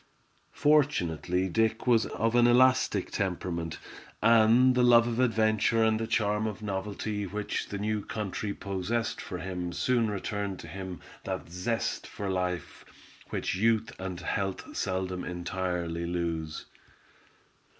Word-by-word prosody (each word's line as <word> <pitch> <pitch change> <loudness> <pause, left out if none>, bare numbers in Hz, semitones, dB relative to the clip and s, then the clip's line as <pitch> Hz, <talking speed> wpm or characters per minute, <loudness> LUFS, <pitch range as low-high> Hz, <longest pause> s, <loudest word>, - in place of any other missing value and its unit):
Fortunately 95 - +2
Dick 110 +4 +1
was 115 -3 +4
of 115 +1 -1
an 120 0 +5
elastic 125 -5 +4
temperament, 90 -4 -2 0.4
and 115 +3 +6
the 125 - +2
love 120 -1 +6
of 120 0 -2
adventure 110 -2 +3
and 110 0 +3
the 115 - -2
charm 110 -2 +1
of 110 0 -6
novelty 105 +1 -3
which 105 +3 -3
the 100 - -3
new 105 0 -1
country 105 -1 -3
possessed 100 +4 -2
for 90 - -5
him 90 0 -4
soon 120 +2 +1
returned 100 -1 -3
to - - -10
him 95 -2 -7 0.2
that - - -4
zest 100 +7 -2
for 100 -1 -4
life 90 -1 -3 0.5
which - - -2
youth 110 +3 +2
and 95 -2 -5
health 95 +1 -3
seldom 95 -1 -2
entirely 90 -1 -3
lose. 85 -3 -3
100 Hz, 130 wpm, -29 LUFS, 90-115 Hz, 0.5 s, and